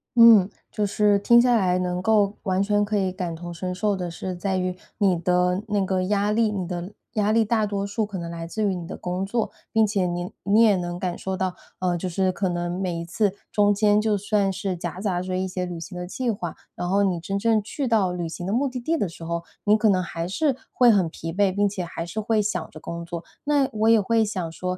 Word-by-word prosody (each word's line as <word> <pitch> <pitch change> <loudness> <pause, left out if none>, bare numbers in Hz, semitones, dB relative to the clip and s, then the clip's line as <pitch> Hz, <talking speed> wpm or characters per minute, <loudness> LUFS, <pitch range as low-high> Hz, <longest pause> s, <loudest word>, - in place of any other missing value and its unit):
嗯， 225 -5 +8 0.2
就 210 - 0
是 205 0 +3
听 235 +4 +6
下 245 0 +4
来 185 -5 +2
能 180 0 -1
够 205 0 +2
完 190 -2 +1
全 205 0 +2
可 210 +1 0
以 190 -2 +1
感 180 -3 -4
同 175 +1 -7
身 180 +2 -4
受 205 +3 0
的 180 -2 -4
是 180 +2 -5
在 190 +1 -1
于 185 0 -1 0.2
你 195 -4 +3
的 180 +2 +1
那 205 -2 +1
个 185 0 0
压 205 +1 +1
力 220 0 +2
你 190 -4 -3
的 180 +3 -5 0.2
压 210 -1 +1
力 225 0 +4
大 220 0 +1
多 200 -1 -2
数 215 +2 -1
可 205 -2 -6
能 170 -1 -5
来 165 0 -6
自 215 +6 -3
于 200 -2 +1
你 175 -2 -6
的 - - -6
工 180 +2 -3
作， 225 +3 -1 0.2
并 220 0 +5
且 200 -3 0
你 175 0 -3
你 205 +3 +4
也 215 -3 +6
能 175 -1 -3
感 180 -2 -2
受 190 0 -3
到， 185 -1 -2 0.2
呃， 180 -1 0
就 185 - -3
是 185 +1 +1
可 190 +1 -1
能 175 +1 -2
每 180 -3 -2
一 - - -4
次 190 +3 0 0.2
中 205 -1 +4
间 210 0 +3
就 215 -1 +1
算 200 -1 +1
是 190 -1 -3
夹 175 +1 -5
杂 190 -4 0
着 185 0 -3
一 185 +1 -1
些 185 0 -3
旅 175 -2 -6
行 180 +2 -8
的 180 - -4
计 245 +7 -3
划， 180 -7 -3 0.2
然 175 - -3
后 195 +2 +2
你 185 -3 +1
真 195 +4 -3
正 225 0 +2
去 265 +5 -3
到 210 -6 +2
旅 175 -2 -3
行 175 +2 -6
的 195 - -1
目 270 +5 +2
的 250 0 -5
地 315 +7 0
的 205 - -1
时 165 - -11
候 170 0 -2 0.2
你 210 - +5
可 215 0 +3
能 185 -2 +2
还 165 0 -4
是 275 - +1 0.2
会 245 -2 +5
很 190 -6 +2
疲 165 +1 -6
惫， 195 0 +2
并 205 +1 +2
且 195 -2 -3
还 165 -1 -5
是 175 +6 -5
会 220 0 +2
想 180 -5 -2
着 155 - -11
工 170 +2 -6
作。 170 0 -6 0.2
那 285 -2 +2
我 220 +1 +2
也 225 -1 +6
会 225 +2 +2
想 190 -6 -3
说， 180 +2 -3
190 Hz, 275 characters per minute, -24 LUFS, 180-210 Hz, 0.2 s, 嗯